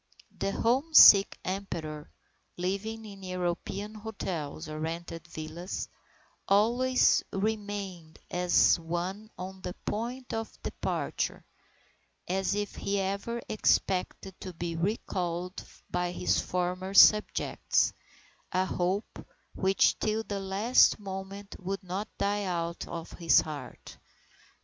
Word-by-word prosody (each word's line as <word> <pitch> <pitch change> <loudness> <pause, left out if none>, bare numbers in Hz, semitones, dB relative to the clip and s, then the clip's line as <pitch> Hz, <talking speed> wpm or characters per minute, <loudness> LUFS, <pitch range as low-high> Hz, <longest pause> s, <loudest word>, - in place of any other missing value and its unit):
The 195 - -1
homesick 240 -4 +7
Emperor, 165 -6 -4 0.5
living 200 +5 -3
in 200 -2 -10
European 185 +3 -3
hotels 185 -8 -5
or 155 0 -6
rented 165 +1 -5
villas, 165 +3 -6 0.6
"always 240 +6 +4
remained 200 -5 -3
as 180 0 +4
one 175 +6 -4
on 190 +1 -7
the 180 - -5
point 245 +4 -4
of 225 0 -5
departure, - - -3 0.8
as 190 +2 0
if 205 0 -2
he 200 0 -1
ever 200 +5 -2
expected 190 -2 0
to 185 - -6
be 170 0 -4
recalled 180 -1 -2 0.3
by 180 0 0
his 180 +1 +1
former 185 +2 -2
subjects, 210 +1 +5 0.6
a 185 0 +2
hope 185 +3 -2 0.3
which 190 0 +2
till 215 +1 0
the 200 -2 -4
last 195 +6 +4
moment 195 0 -7
would 195 +1 -4
not 190 +4 -4
die 205 0 0
out 170 -2 -3
of 165 -1 -6
his 170 -2 +4
heart." 150 -2 -9
190 Hz, 110 wpm, -29 LUFS, 175-205 Hz, 0.8 s, homesick